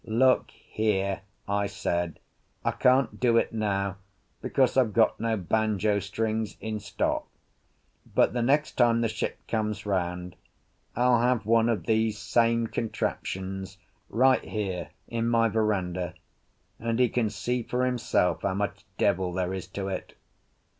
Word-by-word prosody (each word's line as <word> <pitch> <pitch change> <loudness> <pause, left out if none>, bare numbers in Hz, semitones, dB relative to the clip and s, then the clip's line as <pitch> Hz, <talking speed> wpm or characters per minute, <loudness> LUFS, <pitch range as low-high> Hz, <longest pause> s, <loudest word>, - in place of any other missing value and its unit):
"Look 125 +3 +3
here," 100 -3 -1 0.3
I 100 0 +1
said, 85 -4 -2 0.5
"I - - +3
can't 130 +1 +2
do 120 -2 +4
it - - +1
now 100 -3 -1 0.4
because 130 -3 +2
I've 125 -5 +3
got 110 0 +3
no 115 -1 0
banjo 105 +1 +1
strings 110 +2 -2
in 110 -1 -3
stock; 100 -1 -2 0.9
but - - +4
the 120 - 0
next 145 +5 +2
time 115 -1 +4
the 115 - +2
ship 110 0 -3
comes 105 -2 -2
round 90 -2 -2 0.6
I'll 125 0 +4
have 120 -3 +2
one 115 +1 +4
of 115 - -1
these 110 -1 +1
same 115 +3 +2
contraptions 95 -4 -3 0.3
right 130 +3 +4
here 95 -6 -3 0.2
in 115 0 -1
my 115 -1 +3
verandah, 95 -5 -1 0.6
and 115 0 -1
he 125 0 +4
can 115 -2 0
see 120 +4 -2
for 125 +2 -1
himself 120 -8 +1
how 95 -1 0
much 100 -1 -2
devil 90 0 +1
there 90 +1 -1
is 95 -1 -5
to 95 0 -5
it. 95 - -5
110 Hz, 145 wpm, -27 LUFS, 95-115 Hz, 0.9 s, do